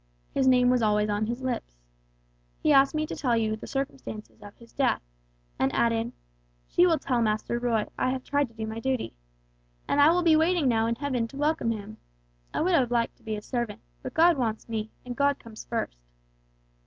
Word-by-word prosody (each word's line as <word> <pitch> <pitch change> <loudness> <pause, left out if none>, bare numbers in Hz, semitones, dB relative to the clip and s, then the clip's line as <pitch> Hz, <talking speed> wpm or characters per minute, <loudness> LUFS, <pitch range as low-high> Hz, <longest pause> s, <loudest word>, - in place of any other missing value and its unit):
His 265 - +2
name 250 -1 +5
was 250 -1 +2
always 210 -1 +2
on 205 +1 0
his 240 +3 -4
lips. 240 - -3 0.8
He 300 - +3
asked 275 +2 +5
me 310 0 +1
to - - -5
tell 245 -4 +1
you 220 -1 +1
the 220 - -10
circumstances 270 -6 -5
of 205 -1 -12
his 235 -1 -18
death, 270 - +1 0.6
and 135 - +2
added, 230 0 +1 0.6
'She 355 - +4
will 330 -2 +3
tell 250 -5 0
Master 215 +2 0
Roy, 230 -3 +1
I - - +2
have 255 0 -2
tried 285 -1 +1
to 230 - -22
do 220 -1 -4
my 220 +1 -5
duty. 255 - -2 0.7
And 285 - +3
I 290 - +8
will 350 +2 +3
be 325 -2 +5
waiting 325 -1 +3
now 225 -2 +2
in 230 - 0
heaven 255 -3 -1
to 270 - -11
welcome 300 -3 +1
him. 215 -1 -5 0.5
I - - -1
would 360 +3 +2
have 260 -7 +3
liked 235 -1 0
to - - -27
be 220 -1 -3
his 210 - -8
servant, 235 -4 -3 0.2
but 255 - -7
God 335 0 +5
wants 220 -3 -2
me, 220 -1 -3 0.2
and 245 -1 -5
God 280 +1 +2
comes 220 -1 -11
first.' 225 - -3
240 Hz, 210 wpm, -27 LUFS, 220-275 Hz, 0.8 s, I